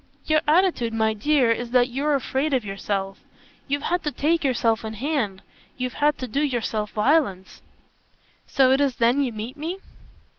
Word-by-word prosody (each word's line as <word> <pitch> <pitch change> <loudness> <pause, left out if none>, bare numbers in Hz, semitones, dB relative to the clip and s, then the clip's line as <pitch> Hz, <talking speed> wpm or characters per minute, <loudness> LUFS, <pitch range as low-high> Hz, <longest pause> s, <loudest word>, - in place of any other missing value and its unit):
"Your 310 -1 +3
attitude, 310 -8 +2
my 220 0 +1
dear, 255 +2 +2
is 240 +1 -2
that 250 0 +3
you're 285 +4 0
afraid 275 +2 -1
of 245 -4 -1
yourself. 195 0 -3 0.5
You've 285 +1 -1
had 355 +1 0
to 300 - -2
take 315 +5 0
yourself 235 -4 +1
in 220 0 -5
hand. 220 -6 -2 0.3
You've 255 -1 -3
had 295 0 +3
to 255 - -5
do 275 +5 -1
yourself 230 -6 -1
violence." 210 - 0 0.9
"So 265 -2 +3
it 270 +2 +3
is 275 -3 +1
then 240 +4 +2
you 265 -3 0
meet 225 +5 -7
me?" 330 +5 -4
255 Hz, 175 wpm, -23 LUFS, 220-295 Hz, 0.9 s, Your